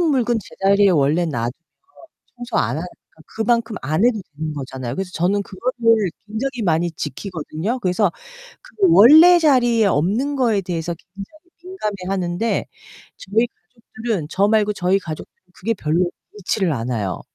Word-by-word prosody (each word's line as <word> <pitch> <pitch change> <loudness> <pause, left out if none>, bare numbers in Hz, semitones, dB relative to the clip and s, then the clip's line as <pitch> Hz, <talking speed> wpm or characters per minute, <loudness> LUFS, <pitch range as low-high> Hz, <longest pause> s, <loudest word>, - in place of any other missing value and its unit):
썼던 - - +2
물건 245 -4 +1
제자리에 200 +1 +2
원래 160 +1 +2
놔두면 120 -6 -2 0.8
청소 240 -1 -4
안 125 +5 0
하니까 175 +3 -5 0.4
그만큼 230 0 -1
안 155 +8 0
해도 225 -4 +2 0.2
되는 155 -1 -4
거잖아요. 130 -3 -6
그래서 190 +1 -4
저는 190 +4 +1
그거를 230 -1 0 0.2
굉장히 245 +4 -3
많이 170 -1 +1
지키거든요? 175 - -4
그래서 185 -1 +1 0.5
그 - - -19
원래 330 - +8
자리에 240 -8 +3
없는 205 - +1
거에 230 -6 +2
대해서 170 -2 -3
굉장히 195 - -13 0.2
민감해하는데 195 - -2 0.5
저희 220 +5 0
가족들은 225 -7 -6
저 200 +2 +2
말고 210 -1 +2
저희 190 0 +1
가족 160 -5 -7 0.3
그게 225 +5 -2
별로 175 -1 0 0.3
있지를 190 -2 0
않아요. 115 -6 -3
200 Hz, 335 characters per minute, -20 LUFS, 170-230 Hz, 0.8 s, 원래